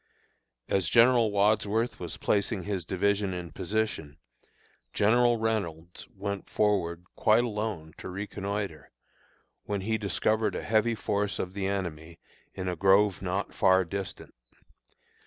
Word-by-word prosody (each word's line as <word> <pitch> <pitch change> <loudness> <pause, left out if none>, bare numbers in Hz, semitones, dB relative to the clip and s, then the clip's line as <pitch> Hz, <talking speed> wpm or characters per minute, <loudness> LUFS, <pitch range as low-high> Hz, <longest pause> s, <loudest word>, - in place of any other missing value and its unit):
As 95 -4 +1
General 120 -1 +5
Wadsworth 105 +3 +1
was 85 -3 -6
placing 100 -1 0
his 95 -4 -3
division 100 0 0
in 85 -2 -6
position, 105 -6 -2 0.8
General 120 +3 +4
Reynolds 90 -7 -3
went 100 0 -5
forward 90 -5 0
quite 110 +2 +4
alone 105 -8 -3
to - - -7
reconnoitre, 100 -4 -4 0.8
when 100 -1 -2
he 110 +3 -1
discovered 110 +2 0
a - - -4
heavy 110 +1 +2
force 105 -1 -1
of 90 0 -4
the 95 -1 -2
enemy 85 -4 -4 0.4
in 95 -1 -4
a 90 - -1
grove 95 +2 +4
not 95 +1 -2
far 95 -1 +4
distant. 100 +3 -6
100 Hz, 125 wpm, -28 LUFS, 90-110 Hz, 0.8 s, General